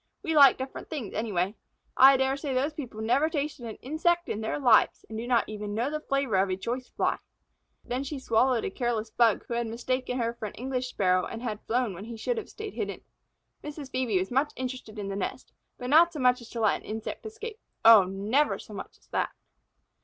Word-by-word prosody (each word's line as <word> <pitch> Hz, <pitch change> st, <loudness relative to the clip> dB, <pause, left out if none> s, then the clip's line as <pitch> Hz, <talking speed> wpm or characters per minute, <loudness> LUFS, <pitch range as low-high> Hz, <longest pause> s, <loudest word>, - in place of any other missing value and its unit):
We 325 Hz, -4 st, -1 dB
like 280 Hz, -2 st, +8 dB
different 260 Hz, +1 st, -7 dB
things 275 Hz, -, -5 dB
anyway. 200 Hz, -3 st, -1 dB, 0.4 s
I 270 Hz, +1 st, +8 dB
dare 265 Hz, +1 st, +1 dB
say 275 Hz, -2 st, -3 dB
those 280 Hz, +4 st, +1 dB
people 245 Hz, -8 st, -7 dB
never 270 Hz, +8 st, +2 dB
tasted 290 Hz, -5 st, -3 dB
an 220 Hz, -, -6 dB
insect 345 Hz, +5 st, +1 dB
in 215 Hz, -, -2 dB
their 220 Hz, -, -2 dB
lives 250 Hz, -6 st, +4 dB
and 220 Hz, -, -8 dB
do 230 Hz, +2 st, -4 dB
not 245 Hz, -2 st, +2 dB
even 210 Hz, -1 st, -5 dB
know 240 Hz, +6 st, 0 dB
the 305 Hz, -, -2 dB
flavor 275 Hz, -8 st, 0 dB
of 190 Hz, +1 st, +2 dB
a 185 Hz, -, -1 dB
choice 245 Hz, +5 st, -4 dB
Fly." -, -, 0 dB, 0.7 s
Then 250 Hz, +2 st, -2 dB
she 280 Hz, +1 st, -5 dB
swallowed 250 Hz, -1 st, +2 dB
a -, -, -2 dB
careless 225 Hz, -1 st, -2 dB
Bug 230 Hz, -2 st, +3 dB
who -, -, -5 dB
had 235 Hz, 0 st, -1 dB
mistaken 250 Hz, +2 st, -2 dB
her 235 Hz, -1 st, 0 dB
for 225 Hz, -2 st, -5 dB
an -, -, -10 dB
English 255 Hz, +1 st, -3 dB
Sparrow 185 Hz, -6 st, +1 dB
and 225 Hz, -, -7 dB, 0.2 s
flown 240 Hz, -3 st, +1 dB
when 185 Hz, +4 st, -8 dB
he 230 Hz, 0 st, -7 dB
should 480 Hz, -, -1 dB
have 440 Hz, -, -9 dB
stayed 425 Hz, -1 st, -7 dB
hidden. -, -, -4 dB, 0.6 s
Mrs. 295 Hz, -2 st, -7 dB
Phœbe 250 Hz, -6 st, 0 dB
was 185 Hz, +4 st, -2 dB
much 270 Hz, +4 st, +1 dB
interested 255 Hz, -4 st, -6 dB
in 205 Hz, -1 st, -4 dB
the 195 Hz, -, -3 dB
nest, 200 Hz, -, -5 dB, 0.2 s
but 250 Hz, +1 st, -5 dB
not 340 Hz, +3 st, +6 dB
so 305 Hz, -, -5 dB
much 250 Hz, -1 st, +3 dB
as 235 Hz, -, -12 dB
to 230 Hz, -, -4 dB
let 215 Hz, -, +3 dB
an -, -, -17 dB
insect 220 Hz, 0 st, -5 dB
escape. 445 Hz, 0 st, -8 dB, 0.3 s
Oh, 225 Hz, -4 st, +9 dB
never 205 Hz, +10 st, +1 dB
so -, -, -11 dB
much -, -, -8 dB
as -, -, -29 dB
that! -, -, 0 dB
250 Hz, 220 wpm, -28 LUFS, 220-275 Hz, 0.7 s, Oh